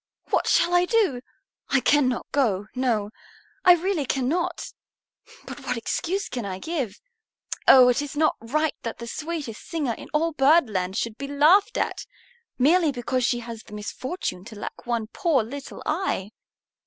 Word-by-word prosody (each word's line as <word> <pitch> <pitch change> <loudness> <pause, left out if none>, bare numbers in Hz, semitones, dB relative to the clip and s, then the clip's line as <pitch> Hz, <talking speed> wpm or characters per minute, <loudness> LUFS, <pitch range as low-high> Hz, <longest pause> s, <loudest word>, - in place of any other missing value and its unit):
What - - +2
shall 345 +1 +3
I 355 0 +4
do? 375 - +1 0.5
I 275 - +3
cannot 260 -2 +2
go, 210 -9 +1
no, 230 -5 0 0.5
I 360 -1 +8
really 345 -5 -1
cannot. 335 +7 -1 0.7
But - - -8
what 250 -2 -2
excuse 365 - -2
can 245 -2 -4
I 190 -2 -4
give? 260 - -4 0.7
Oh, 255 -2 +9
it 250 +3 +2
is 290 0 -6
not 310 0 +3
right 300 +6 0
that 230 - -5
the 235 - -7
sweetest 295 -3 -5
singer 295 -8 -1
in - - -11
all 325 +2 +1
Birdland 260 - +2
should 230 -2 -3
be 280 - -4
laughed 335 - +4
at, - - -2 0.5
merely 315 +4 +4
because 255 0 -2
she 240 0 +1
has 230 -1 -8
the 210 - -15
misfortune 210 - -5
to 220 -1 -10
lack - - -8
one 235 -2 0
poor 275 +2 +1
little 275 +5 -8
eye!" 305 - -1
270 Hz, 160 wpm, -25 LUFS, 235-325 Hz, 0.7 s, Oh